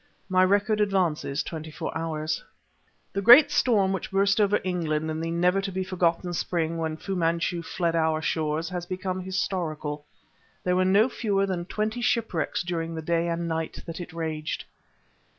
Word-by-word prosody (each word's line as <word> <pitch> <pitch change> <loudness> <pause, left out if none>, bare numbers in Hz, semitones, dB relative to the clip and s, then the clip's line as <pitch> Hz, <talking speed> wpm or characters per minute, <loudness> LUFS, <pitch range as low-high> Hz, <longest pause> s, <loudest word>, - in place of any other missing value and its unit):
My 185 0 +4
record 205 +3 +2
advances 175 -8 0
twenty 160 -1 -6
four 150 - -5
hours. 155 -1 -2 0.7
The 200 - -1
great 265 +8 +9
storm 205 -9 +3
which 190 - -4
burst 195 +2 +3
over 205 0 +3
England 160 -4 -1
in 155 +1 -3
the 165 - -2
never 180 +3 +2
to 195 0 -4
be 190 0 -2
forgotten 175 -1 0
spring 165 -1 -1
when 160 -1 -2
Fu 195 +3 -4
Manchu 170 0 0
fled 170 0 -1
our 160 -1 +2
shores 155 +1 -1
has 175 -1 -5
become 185 0 -3
historical. 165 -6 -3 0.6
There 180 0 +1
were 185 0 +3
no 200 +5 +5
fewer 205 -6 0
than 180 -3 -3
twenty 215 +5 -2
shipwrecks 225 -12 0
during 165 -1 -3
the 160 - -5
day 170 +1 +1
and 170 0 -2
night 160 -1 -3
that 165 +1 -6
it 175 - -8
raged. 160 -2 -4
175 Hz, 170 wpm, -26 LUFS, 160-195 Hz, 0.7 s, great